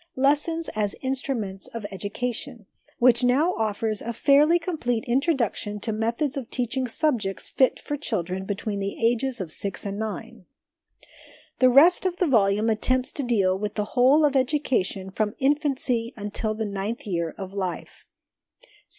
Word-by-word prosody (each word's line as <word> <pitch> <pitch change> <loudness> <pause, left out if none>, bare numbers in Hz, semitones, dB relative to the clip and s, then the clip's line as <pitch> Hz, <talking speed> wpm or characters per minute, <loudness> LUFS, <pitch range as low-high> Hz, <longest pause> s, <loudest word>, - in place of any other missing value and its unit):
Lessons 295 +5 +1
as 210 -2 -1
Instruments 250 -7 -3
of 230 -3 -7
Education,' 230 +4 -5 0.3
which 245 0 +4
now 285 +9 +3
offers 215 -1 -1
a 235 - -4
fairly 290 +7 +5
complete 295 -10 -2
intro 275 +6 +2
duction 210 -4 -2
to 220 - -3
methods 230 +6 -1
of 260 -4 -5
teaching 255 +1 -1
subjects 230 -7 -1
fit 260 - +2
for 290 - -4
children 190 - -3
between 200 +1 -3
the 195 0 -3
ages 240 +2 +1
of 175 -5 -4
six 200 +5 -3
and 200 +1 -4
nine. 220 -1 -6 1.1
The 255 - +6
rest 325 +9 +6
of 355 -1 -3
the 365 - +2
volume 210 - +3
attempts 255 +4 +1
to 285 - -2
deal 200 -7 +2
with 205 +2 -4
the 210 - -1
whole 270 +5 +5
of 285 -2 +1
education 255 -9 0
from 210 +1 -1
infancy 270 -4 0
until 215 +1 -3
the 220 0 -2
ninth 200 +3 -4
year 170 -5 -2
of 190 -1 -7
life. 190 -3 -5
235 Hz, 155 wpm, -25 LUFS, 205-270 Hz, 1.1 s, The